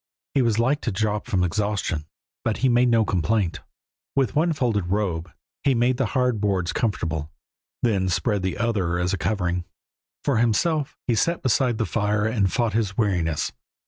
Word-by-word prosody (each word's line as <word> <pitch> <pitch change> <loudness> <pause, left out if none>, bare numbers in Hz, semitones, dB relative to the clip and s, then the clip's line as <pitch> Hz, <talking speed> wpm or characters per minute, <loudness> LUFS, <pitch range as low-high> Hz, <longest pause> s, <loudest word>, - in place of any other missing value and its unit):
He 135 - +3
was 115 -3 +2
like 130 +6 +2
to 120 - -1
drop 105 +1 -1
from 90 -2 +1
exhaustion, 95 -4 -1 0.4
but 115 -2 0
he - - +5
made 120 +1 +4
no 115 -2 +4
complaint. 95 0 0 0.6
With 135 -3 +1
one 165 +3 +3
folded 115 - 0
robe 90 -4 -1 0.3
he 135 -2 +3
made 120 +2 +2
the 130 -3 +1
hard 125 -4 +1
boards 95 -4 0
comfortable, 80 -9 -1 0.5
then 100 -6 +2
spread 105 +2 0
the 95 -1 -2
other 100 -7 0
as 90 +1 0
a - - 0
covering. 90 -5 -1 0.6
For 140 -5 +1
himself 135 +6 +1
he 120 - +1
sat 170 +10 +1
beside 125 -1 +2
the 110 - 0
fire 105 -1 0
and 105 -5 +1
fought 115 -3 0
his 105 -3 -1
weariness. 85 -8 0
105 Hz, 175 wpm, -24 LUFS, 95-120 Hz, 0.6 s, he